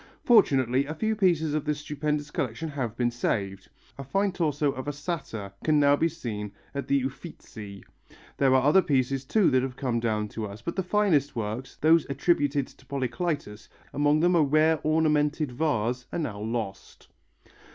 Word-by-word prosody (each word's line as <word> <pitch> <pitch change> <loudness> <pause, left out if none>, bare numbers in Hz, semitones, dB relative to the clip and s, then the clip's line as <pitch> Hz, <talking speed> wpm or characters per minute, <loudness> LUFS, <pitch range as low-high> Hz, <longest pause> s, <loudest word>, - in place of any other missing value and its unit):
Fortunately 135 - +4
a 155 - -5
few 220 +6 0
pieces 170 -7 +2
of 155 -1 0
this 150 -1 -1
stupendous 150 0 -3
collection 140 +5 -3
have 125 -6 -4
been 120 -1 +1
saved: 100 -5 -2 0.3
a - - -4
fine 195 +9 0
torso 150 -5 0
of 130 +1 -7
a - - 0
Satyr 140 - -5
can 155 -1 +3
now 145 0 +5
be 165 - +2
seen 110 -10 -6 0.2
in 140 0 -3
the 140 -2 +2
Uffizi. 110 - -8 0.5
There 135 -1 +4
are 130 - +4
other 150 +7 +5
pieces 135 -3 0
too 205 +7 +3
that 130 - +3
have 130 -1 -4
come 125 -4 -1
down 110 -2 -1
to 110 0 -5
us, 100 +2 -11
but 170 - -4
the 190 - 0
finest 180 -7 +1
works, 115 +3 -4
those 160 0 +3
attributed 145 -1 +1
to 135 - -20
Polycletus, 135 -4 -3 0.2
among 145 +2 +2
them 175 +1 +3
a 165 - +5
rare 155 +2 +3
ornamented 155 -2 +1
vase, 125 -3 -1
are - - -3
now 120 -11 -3
lost. 110 -2 -5
140 Hz, 175 wpm, -27 LUFS, 120-155 Hz, 0.5 s, now